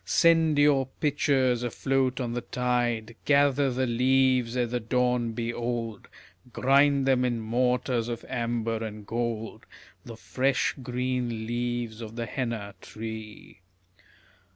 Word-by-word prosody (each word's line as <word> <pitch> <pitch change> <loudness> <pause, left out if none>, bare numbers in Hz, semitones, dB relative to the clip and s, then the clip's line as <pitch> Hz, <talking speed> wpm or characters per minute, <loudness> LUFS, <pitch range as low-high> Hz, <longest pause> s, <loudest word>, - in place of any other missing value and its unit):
Send 165 -3 +4
your 145 -2 +4
pitchers 135 -4 +2
afloat 130 +2 0
on 120 -2 -2
the 120 - -2
tide, 120 -3 -1
Gather 140 -1 +3
the 130 +1 0
leaves 125 0 +2
ere 125 - +2
the 120 +1 -2
dawn 125 0 0
be 115 +1 -3
old, 115 -3 -4 0.4
Grind 140 +2 +3
them 130 -2 +3
in 120 -2 0
mortars 125 +1 0
of 120 -1 -5
amber 115 -2 -2
and 105 -1 -7
gold, 115 -1 -4 0.4
The 115 -1 -10
fresh 130 +3 0
green 125 -2 -2
leaves 120 -1 -3
of 110 0 -8
the 120 -1 -3
henna 115 -4 -4
tree. 110 -1 -8
120 Hz, 130 wpm, -27 LUFS, 115-130 Hz, 0.4 s, Send